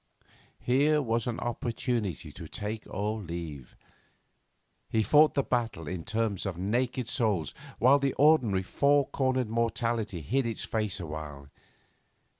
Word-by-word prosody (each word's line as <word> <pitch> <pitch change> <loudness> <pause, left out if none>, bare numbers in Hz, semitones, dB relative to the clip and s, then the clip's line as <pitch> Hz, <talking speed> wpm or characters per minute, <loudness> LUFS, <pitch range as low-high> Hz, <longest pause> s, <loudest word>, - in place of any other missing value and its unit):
Here 145 +5 +3
was 115 -4 -1
an 120 - -2
opportunity 120 - -2
to - - -9
take 105 +1 -5
or 105 +3 -2
leave. 85 -7 -7 1.1
He 110 - +2
fought 150 +6 +5
the 140 - +2
battle 115 - -2
in 85 0 -5
terms 110 -2 -1
of 90 -3 -4
naked 120 +6 -1
souls, 105 - 0 0.2
while 135 +4 +5
the 140 -1 0
ordinary 130 -10 +4
four 140 +7 +3
cornered 130 -4 0
morality 115 -4 -1
hid 125 - 0
its 115 - -3
face 110 -4 -2
awhile. 75 -4 -7
115 Hz, 130 wpm, -29 LUFS, 95-125 Hz, 1.1 s, fought